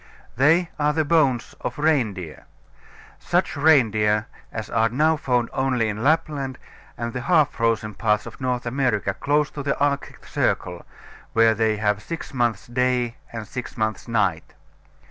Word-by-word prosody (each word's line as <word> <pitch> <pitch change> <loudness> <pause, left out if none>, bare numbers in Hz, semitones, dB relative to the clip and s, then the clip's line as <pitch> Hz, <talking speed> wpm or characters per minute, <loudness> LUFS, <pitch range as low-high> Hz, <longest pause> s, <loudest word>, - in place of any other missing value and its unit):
They 160 +7 +3
are 150 0 +2
the 160 0 +1
bones 145 -7 +2
of - - -4
reindeer 110 - -1 0.7
such - - 0
reindeer 110 -8 +3 0.3
as 110 -1 -5
are 115 0 +2
now 155 +7 +2
found 125 -6 0
only 125 -4 +1
in 105 +1 -4
Lapland 140 -3 0 0.4
and 120 -1 -4
the 125 - -3
half 155 0 +3
frozen 115 -2 0
parts 105 +1 0
of - - -10
North 125 -1 -1
America, 120 -6 0
close 145 +4 0
to 145 - -6
the 140 0 -1
Arctic 140 0 -1
circle, - - -2 0.5
where 115 0 +5
they 110 0 +1
have 105 -1 0
six 165 +5 -7
months 120 -6 0
day 125 -1 0
and 115 -2 -6
six 125 +3 -7
months 110 +1 -2
night. 100 -8 -1
125 Hz, 150 wpm, -23 LUFS, 110-145 Hz, 0.7 s, where